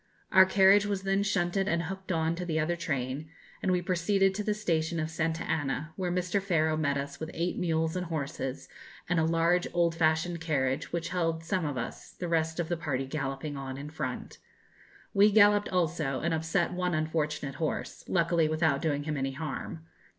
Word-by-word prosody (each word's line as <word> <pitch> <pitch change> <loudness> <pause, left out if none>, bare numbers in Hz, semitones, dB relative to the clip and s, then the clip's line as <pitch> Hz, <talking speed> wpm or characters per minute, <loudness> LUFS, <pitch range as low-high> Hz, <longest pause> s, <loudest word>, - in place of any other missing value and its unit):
Our 190 0 +8
carriage 195 +2 +5
was 200 -2 -2
then 195 +1 +2
shunted 195 -1 0
and 170 -4 +1
hooked 190 +2 -5
on 160 -1 +1
to 180 +2 -4
the 160 -3 -1
other 165 +3 +1
train, 145 -3 -3 0.3
and 185 - +1
we 180 -1 +1
proceeded 190 +2 +2
to 210 +2 -3
the 210 0 0
station 165 -5 0
of 155 0 -2
Santa 160 0 -1
Anna, 155 +1 -2
where 180 -2 -2
Mr. 180 +2 0
Faro 160 -5 +1
met 145 -2 0
us 140 0 -5
with 160 - -5
eight 175 +2 -1
mules 160 -2 0
and 180 -1 -2
horses, 140 -4 -4 0.4
and 175 -1 +2
a - - +3
large 165 +2 +2
old 170 -1 +3
fashioned 165 +1 +1
carriage, 140 -3 0
which 170 -1 -2
held 165 -2 -1
some 175 +1 -1
of 145 -3 -3
us, 120 - -6
the 175 - -5
rest 160 0 0
of 170 - 0
the 175 0 -1
party 135 -5 -2
galloping 135 +1 -4
on 135 -1 -5
in 145 +2 -7
front. 160 - -5 0.7
We 205 0 +6
galloped 205 0 +5
also, 165 -6 0
and 170 0 0
upset 165 +3 0
one 180 -1 0
unfortunate 155 -3 -1
horse, 155 - -3
luckily 170 -3 +2
without 155 -3 +1
doing 145 -3 0
him 150 0 -2
any 135 0 -1
harm. 160 +2 -5
165 Hz, 195 wpm, -29 LUFS, 155-180 Hz, 0.7 s, Our